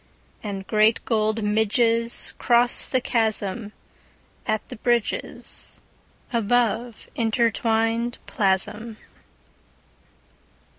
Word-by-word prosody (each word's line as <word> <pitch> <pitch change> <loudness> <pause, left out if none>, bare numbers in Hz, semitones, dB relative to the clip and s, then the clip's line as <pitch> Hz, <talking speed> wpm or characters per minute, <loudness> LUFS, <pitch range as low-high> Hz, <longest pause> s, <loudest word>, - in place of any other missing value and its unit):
And 195 -2 -5
great 215 +2 +2
gold 215 -1 0
midgesCross 230 +3 +1
the 255 - +1
chasmAt 220 -2 -1 1.0
the - - -8
bridgesAbove 235 0 -1
intertwined 230 0 +1
plasm. 210 +2 0
225 Hz, 55 wpm, -24 LUFS, 215-235 Hz, 1.0 s, great